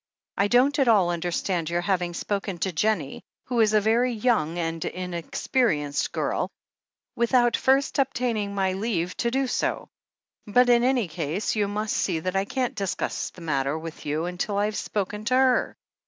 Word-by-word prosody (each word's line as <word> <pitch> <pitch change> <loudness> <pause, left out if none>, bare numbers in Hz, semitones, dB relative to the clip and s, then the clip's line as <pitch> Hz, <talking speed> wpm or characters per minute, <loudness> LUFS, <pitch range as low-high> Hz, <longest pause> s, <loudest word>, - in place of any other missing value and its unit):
I 200 - +2
don't 260 +6 +3
at 270 - +3
all 195 -6 +4
understand 175 0 -1
your 175 +1 0
having 175 -2 -1
spoken 195 -1 -3
to 190 - 0
Jennie, 175 -4 -1 0.2
who 245 -2 -2
is 215 -2 +4
a - - +6
very 230 +4 +2
young 210 -8 +1
and 165 -1 -2
inexperienced 170 - -1
girl, - - -1 0.7
without 240 0 +3
first 270 +2 +2
obtaining 240 -6 0
my 190 -1 +1
leave 185 -3 -2
to 235 - 0
do 265 +3 0
so; 250 - -2 0.6
but 245 +4 +4
in 240 0 +5
any 250 -5 +2
case, 165 +6 -2
you 210 -2 +1
must 210 +1 -2
see 175 -4 0
that 185 +3 -3
I 195 0 +1
can't 255 +3 -2
discuss 195 -3 -2
the 180 - -15
matter 140 -2 -1
with 160 -1 -8
you 155 +3 -1
until 180 +3 -2
I've 210 +1 0
spoken 210 +1 -3
to 255 - +2
her." 260 -1 +3
200 Hz, 170 wpm, -25 LUFS, 175-240 Hz, 0.7 s, a